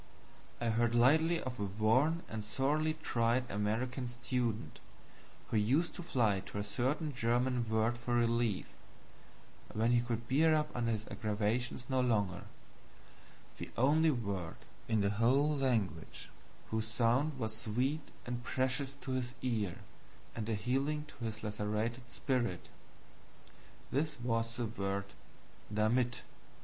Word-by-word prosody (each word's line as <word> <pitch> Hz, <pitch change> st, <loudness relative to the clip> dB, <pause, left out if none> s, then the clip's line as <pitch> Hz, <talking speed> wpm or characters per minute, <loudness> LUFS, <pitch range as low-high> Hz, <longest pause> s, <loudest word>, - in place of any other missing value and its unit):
I 120 Hz, -, 0 dB
heard 115 Hz, +1 st, +2 dB
lately 160 Hz, +8 st, +5 dB
of 125 Hz, -3 st, -5 dB
a -, -, 0 dB
worn 115 Hz, -, +2 dB
and 110 Hz, -1 st, -4 dB
sorely 150 Hz, +7 st, +1 dB
tried 120 Hz, +2 st, +2 dB
American 120 Hz, +5 st, -1 dB
student 120 Hz, -2 st, -2 dB, 0.7 s
who 110 Hz, -, +1 dB
used 135 Hz, +11 st, +2 dB
to -, -, -6 dB
fly 115 Hz, -, +2 dB
to -, -, -6 dB
a 100 Hz, -, -1 dB
certain 135 Hz, +8 st, -1 dB
German 120 Hz, 0 st, +1 dB
word 110 Hz, +2 st, +1 dB
for 120 Hz, 0 st, -1 dB
relief 115 Hz, -3 st, +2 dB, 1.1 s
when 115 Hz, +2 st, +3 dB
he 120 Hz, -1 st, +5 dB
could 120 Hz, -1 st, -3 dB
bear 155 Hz, +5 st, +4 dB
up 150 Hz, 0 st, -1 dB
under 120 Hz, -1 st, +1 dB
his 110 Hz, -1 st, -2 dB
aggravations 110 Hz, +3 st, -1 dB
no 130 Hz, -1 st, +2 dB
longer 105 Hz, -7 st, +1 dB, 1.1 s
the -, -, -5 dB
only 155 Hz, +6 st, +5 dB
word 100 Hz, -, -2 dB, 0.3 s
whose 110 Hz, -, 0 dB
sound 125 Hz, +6 st, +2 dB
was 110 Hz, -3 st, -2 dB
sweet 130 Hz, +8 st, -1 dB, 0.2 s
and 120 Hz, 0 st, -4 dB
precious 130 Hz, +3 st, -1 dB
to 130 Hz, -, -4 dB
his 125 Hz, -1 st, -2 dB
ear 110 Hz, -8 st, -1 dB, 0.5 s
and 110 Hz, -2 st, -3 dB
healing 135 Hz, +7 st, 0 dB
to 120 Hz, -, -7 dB
his 110 Hz, -1 st, -4 dB
lacerated 105 Hz, +4 st, -2 dB
spirit. 125 Hz, -8 st, -1 dB, 1.2 s
This 150 Hz, +1 st, 0 dB
was 115 Hz, -1 st, -1 dB
the 120 Hz, -, 0 dB
word 100 Hz, -3 st, -2 dB, 0.7 s
DAMIT. 115 Hz, +3 st, +1 dB
120 Hz, 125 wpm, -34 LUFS, 110-130 Hz, 1.2 s, lately